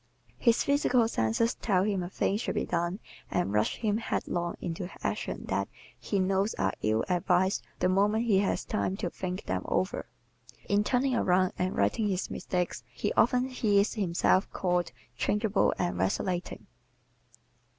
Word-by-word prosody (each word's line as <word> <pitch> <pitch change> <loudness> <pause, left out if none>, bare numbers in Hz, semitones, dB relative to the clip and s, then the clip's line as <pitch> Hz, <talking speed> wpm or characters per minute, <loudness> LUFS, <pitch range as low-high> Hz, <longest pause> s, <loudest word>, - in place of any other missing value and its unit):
His 235 -2 +3
physical 265 -4 +3
senses 115 - +1
tell 190 -4 +1
him 200 -2 0
a 175 - -4
thing 195 - 0
should 220 - -3
be - - 0
done 175 +2 -1 0.3
and 175 - 0
rush 105 0 +2
him 215 -2 0
headlong 175 -6 -2
into 175 +1 -4
actions - - -3
that - - 0 0.3
he 205 - -2
knows 195 +2 +1
are 95 0 0
ill 110 +1 +1
advised 180 +2 +2 0.2
the - - +2
moment 205 +5 +2
he 205 -5 +4
has 200 - 0
time 195 -3 -1
to 175 - -3
think 185 0 -4
them 90 0 -2
over. 185 - -1 0.6
In 205 +1 +3
turning 255 +4 +1
around 185 -5 +2
and 185 +1 -1
righting 105 - +2
his 190 -2 -2
mistakes 180 -9 -2
he 125 - -2
often 250 +2 +3
hears 210 -5 +2
himself 190 -2 +2
called 180 -4 0 0.3
"changeable" 210 - +2
and 90 0 -1
"vacillating." 175 - -2
190 Hz, 155 wpm, -29 LUFS, 175-210 Hz, 0.6 s, he